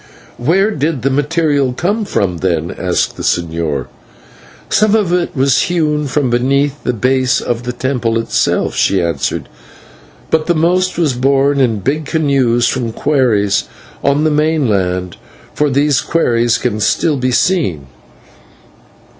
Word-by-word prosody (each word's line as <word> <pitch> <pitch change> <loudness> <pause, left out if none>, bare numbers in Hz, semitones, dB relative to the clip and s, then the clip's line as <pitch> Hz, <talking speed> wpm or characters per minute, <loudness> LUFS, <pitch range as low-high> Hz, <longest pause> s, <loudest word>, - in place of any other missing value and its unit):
"Where 190 - +2
did 150 - -2
the 135 - +1
material 145 -2 +1
come 205 - -1
from, 90 - -1
then?" 85 -1 -1
asked 90 -1 -1
the - - -6
señor. 80 -5 -1 0.8
"Some 215 +1 +2
of 200 -6 +1
it 180 -2 -1
was 135 -1 +3
hewn 150 -4 0
from 135 -2 0
beneath 140 +4 0
the - - -1
base 130 +2 +1
of 120 -1 -3
the 125 0 -4
temple 120 -2 -1
itself," 115 - 0
she 100 - +2
answered, 80 -6 -2 0.8
"but 155 -1 +1
the 175 - +2
most 180 +3 +1
was 160 -6 +1
borne 135 +2 +2
in 115 -6 +1
big 150 +7 -1
canoes 135 -7 +1
from 120 -3 -2
quarries 110 - +1 0.4
on 145 +2 +2
the 155 - +2
mainland, 105 - 0 0.4
for 150 0 +1
these 140 +1 +2
quarries 120 -8 +1
can 105 - -2
still 145 +8 +1
be 130 0 0
seen." 125 - 0
135 Hz, 140 wpm, -15 LUFS, 115-155 Hz, 0.8 s, was